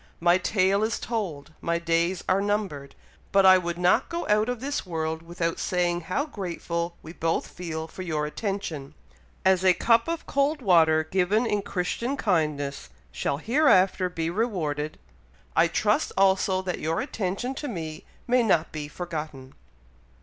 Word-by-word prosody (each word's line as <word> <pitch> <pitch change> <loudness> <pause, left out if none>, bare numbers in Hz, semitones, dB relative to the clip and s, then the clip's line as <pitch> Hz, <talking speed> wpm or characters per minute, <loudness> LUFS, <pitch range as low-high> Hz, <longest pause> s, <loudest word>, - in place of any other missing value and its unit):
My 175 +2 +4
tale 195 +1 +2
is 220 +1 0
told, 170 -11 -4
my 170 0 0
days 170 +1 0
are 190 +1 +3
numbered; 200 -9 -2 0.4
but 195 -1 +5
I 185 0 +8
would 170 -1 -4
not 180 0 +3
go 340 0 -3
out 210 +2 +3
of 245 -2 -2
this 280 +3 -2
world 160 -2 -3
without 165 0 -3
saying 175 -1 0
how 185 - -1
grateful 170 - -4
we 160 - -9
both 165 -1 -1
feel 160 -2 -5
for 175 - -9
your 155 -4 -1
attention. 160 -5 -4 0.5
As 190 -1 +4
a 185 -1 +5
cup 230 0 +3
of 335 0 -3
cold 280 +2 +1
water 165 - +4
given 190 +7 +1
in 210 -3 0
Christian 205 +8 -2
kindness 150 - -1 0.2
shall 140 - -2
hereafter 195 - +3
be 165 -2 -2
rewarded, 160 -8 -2 0.6
I - - +5
trust - - +1
also 190 -1 +3
that 180 -1 -3
your 160 +1 -1
attention 200 +6 -2
to 290 +2 -5
me 160 - -5 0.2
may 250 +1 +3
not 175 -8 +2
be 150 -1 -5
forgotten." 150 -5 -6
180 Hz, 155 wpm, -26 LUFS, 160-205 Hz, 0.6 s, I